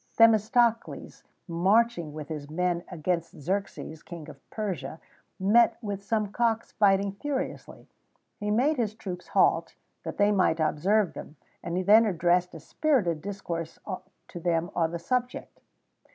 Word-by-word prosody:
[XVII - - -38
7] - - -34
Themistocles, 225 +2 0 0.2
marching 185 0 +2
with 150 0 -8
his 150 -2 -5
army 175 +1 -1
against 170 -1 -2
Xerxes, 165 -1 -4
King 170 -3 -9
of 140 -2 -15
Persia, 165 - -4 0.4
met 215 +5 +4
with 205 -4 -4
some 210 -1 -1
cocks 230 0 0
fighting 200 -1 +3
furiously; 265 +7 -5 0.5
he 210 - -3
made 265 +8 +2
his 215 -3 -1
troops 180 -4 -7
halt, - - +2 0.3
that - - -6
they 205 0 +4
might 185 -5 +2
observe 180 +6 +2
them, 150 - -9 0.3
and 170 +1 -3
he 185 - 0
then 215 +4 +6
addressed 175 -1 +1
a - - -7
spirited 180 - 0
discourse 170 -4 -5 0.5
to 175 - -8
them 170 +1 0
on 165 -2 +1
the 170 - -4
subject. 250 +8 -3
190 Hz, 150 wpm, -27 LUFS, 170-215 Hz, 0.5 s, then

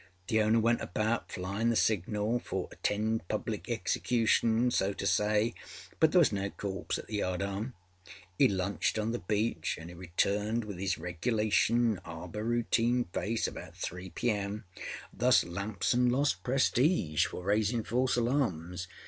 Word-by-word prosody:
The 110 0 +3
owner 110 +2 +4
went 115 +1 +2
about 110 +6 -1
flyinâ 100 +5 -1
the 115 - +2
signal 105 +3 +1
for - - -4
âattend 110 +2 -1
public - - -3
execution,â 115 0 +2
so 95 +1 +1
to 100 - -5
say, 105 +2 +2 0.5
but 160 -1 +5
there - - +3
was 170 - +6
no 100 -1 -1
corpse 100 -1 -4
at - - -7
the 105 -1 -3
yardarm. 100 +6 -2 0.6
âE - - +6
lunched 95 0 0
on 110 +1 0
the 120 - -2
beach 105 -3 -1
anâ 85 +1 -9
âe - - -13
returned 105 +6 0
with 100 -3 -6
âis 95 -3 -1
regulation 110 +5 +1
harbour 85 +5 -6
routine 120 +1 +2
face 115 +2 0
about - - -9
3 90 +2 -5
P.M. 105 0 -2 0.5
Thus 125 +1 +4
Lamson 100 +7 0
lost 130 -7 +1
prestige 125 - +2
for 90 - -7
raising 110 +4 +1
false 125 +3 +1
alarms. 90 - -1
105 Hz, 150 wpm, -31 LUFS, 95-120 Hz, 0.6 s, was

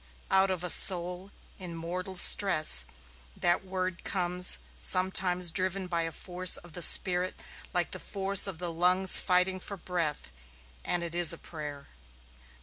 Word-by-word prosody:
Out 190 0 +1
of 185 -2 -5
a 180 - -4
soul 180 +1 +1 0.3
in 175 -3 -10
mortal 180 +3 -8
stress 155 - +5 0.5
that 175 +2 -1
word 185 -2 -7
comes 180 -1 +3 0.2
sometimes 185 -1 +1
driven 185 +2 -3
by 170 -2 -4
a 165 0 -6
force 180 +2 -2
of 175 -2 -16
the 175 - -8
spirit 180 +2 +3 0.3
like - - -3
the - - -6
force 195 0 +1
of 190 -4 -8
the 175 0 -7
lungs 180 +2 +3
fighting 185 +1 -1
for 200 +2 -9
breath 170 - -6 0.5
and 175 -1 -4
it 170 -1 -9
is 170 -1 +2
a - - -11
prayer. 150 -4 -11
180 Hz, 150 wpm, -26 LUFS, 170-185 Hz, 0.5 s, stress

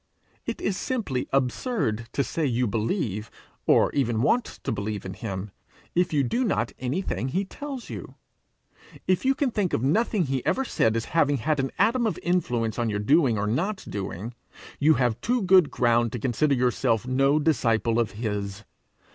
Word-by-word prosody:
It 235 - -3
is 195 -2 -1
simply 210 - -2
absurd 125 - 0
to 140 - +1
say 165 - -3
you 125 -3 +1
believe, 110 - -2 0.4
or - - +5
even 120 -4 0
want 235 - +3 0.2
to - - -1
believe 105 -1 -3
in 95 - -5
him, 95 0 -5 0.4
if 175 +1 +2
you 145 -3 +2
do 235 - 0
not 120 - 0
anything 130 +1 -2
he 185 +9 -1
tells 275 +4 -7
you. - - -8 0.9
If 185 +6 +1
you 270 +1 +4
can 270 -3 0
think 205 -5 -1
of 115 - 0
nothing 210 - +2
he 135 -4 -2
ever 265 - +1
said 110 - +1
as 115 - -1
having 145 -4 +3
had 150 +5 0
an 135 0 0
atom 235 0 +3
of 215 - -2
influence 120 - 0
on 120 -1 +1
your 105 - -1
doing 130 +2 +3
or 100 - 0
not 180 - -1
doing, 100 +3 -5 0.5
you 155 +2 +5
have 120 -2 0
too 245 -1 +1
good 185 -4 +6
ground 120 -1 +2
to 120 - -3
consider 135 +5 +1
yourself 125 -2 +1
no 135 +3 +3
disciple 115 -6 +2
of 115 -3 0
his. 105 -2 -4
130 Hz, 180 wpm, -26 LUFS, 115-180 Hz, 0.9 s, good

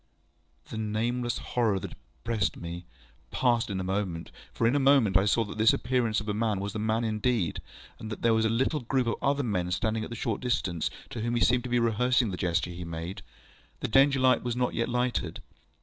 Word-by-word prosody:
The 110 - -4
nameless 120 +3 -1 0.2
horror 115 -5 +2
that - - -7
oppressed 100 - -3
me 85 +1 -7 0.4
passed 120 -3 +1
in 95 -2 -2
a - - -2
moment, 95 -4 -3 0.2
for - - -1
in 120 +4 +3
a - - +3
moment 135 -8 +4
I 95 - +5
saw 115 +3 +3
that 105 0 -8
this 110 +1 +6
appearance 120 -4 0
of 105 - -8
a 105 - 0
man 105 -2 0
was 100 +1 -4
a 110 - -3
man 110 +2 0
indeed, 110 -4 0 0.4
and 110 - -7
that 105 - -6
there 115 -1 +4
was 110 0 +2
a - - +3
little 130 +7 +1
group 130 0 0
of 115 - 0
other 140 +1 +1
men, 90 -7 -1
standing 110 +4 -1
at - - -7
a - - -4
short 115 -2 -2
distance, 100 -10 -1 0.2
to 115 - -4
whom 120 +1 -1
he 120 - 0
seemed 125 0 +3
to - - -4
be 120 - +2
rehearsing 120 0 +2
the 90 - -4
gesture 90 0 0
he 90 0 -7
made. 85 +2 -6 0.6
The - - -1
Danger 135 +3 +4
light 130 -2 +4
was 120 -1 -2
not 125 0 0
yet 115 - -1
lighted. 125 -8 -1
110 Hz, 225 wpm, -28 LUFS, 100-125 Hz, 0.6 s, this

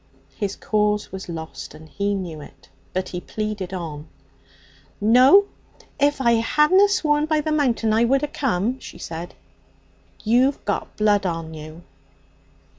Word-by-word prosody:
His 205 -2 -3
cause 210 -1 0
was 190 -1 -7
lost, 160 -2 -7
and 155 +1 -13
he 200 +5 -1
knew 170 -6 -5
it, 135 -1 -15 0.2
but 185 0 -3
he 180 - -5
pleaded 210 -3 -4
on. 160 -5 -6 0.9
'No. 255 - +6 0.5
If 290 0 +2
I 235 -3 +3
hadna 335 - +4
swore 300 -8 +2
by 310 -1 +2
the 310 +1 -2
Mountain 245 -7 +1
I 225 +2 +3
wouldna 275 +4 +1
come,' 250 -2 -1
she - - -11
said. 165 +1 -7 0.9
'You've 250 +5 +2
got 205 - -3
blood 205 -2 +2
on 165 -2 -4
you.' 155 +2 -10
210 Hz, 140 wpm, -22 LUFS, 175-270 Hz, 0.9 s, No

